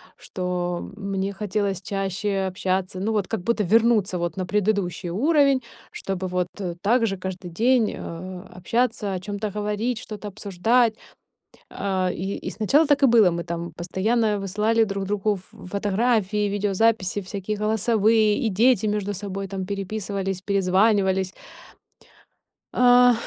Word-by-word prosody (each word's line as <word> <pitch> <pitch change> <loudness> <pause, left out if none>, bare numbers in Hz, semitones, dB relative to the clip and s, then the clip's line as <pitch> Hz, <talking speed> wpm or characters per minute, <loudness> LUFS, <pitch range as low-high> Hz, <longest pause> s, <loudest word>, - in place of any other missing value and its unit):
что 180 -1 -4
мне 195 -1 -3
хотелось 200 -1 -2
чаще 195 -1 -2
общаться, 185 0 -2
ну 220 +3 -1
вот 205 -3 0
как 225 -5 -3
будто 230 +1 0
вернуться 215 -2 +3
вот 170 +1 -3
на 185 - -2
предыдущий 200 -3 0
уровень, 275 - +3 0.3
чтобы 190 -1 -4
вот, 180 0 -1
э, 180 -3 -3
так 230 +2 +3
же 195 -1 -2
каждый 185 -1 -6
день, 230 +5 +2
э, 180 +2 -7
общаться, 215 +1 -1
о 185 - -2
чём-то 205 +2 -4
говорить, 210 +3 -2
что-то 210 -1 -8
обсуждать. 215 +4 +1 0.8
А, 190 -2 -1
и 195 +3 -3
и - - -3
сначала 280 +9 +3
так 285 -1 +2
и - - +8
было. 225 -6 +6
Мы 170 0 -3
там 170 0 -5
постоянно 210 +5 0
высылали 210 +4 +1
друг 195 -1 -3
другу 210 +1 0
ф 190 -1 -12 0.2
фотографии, 210 0 +1
видеозаписи, 205 0 +1
всякие 200 +2 -4
голосовые, 215 0 +2
и 235 -5 0
дети 220 +1 +3
между 205 -1 -1
собой, 195 0 -5
там, 190 -1 -4
переписывались, 195 -1 -3
перезванивались. 190 -1 +2 1.4
А, 245 0 +6
200 Hz, 140 wpm, -24 LUFS, 185-220 Hz, 1.4 s, и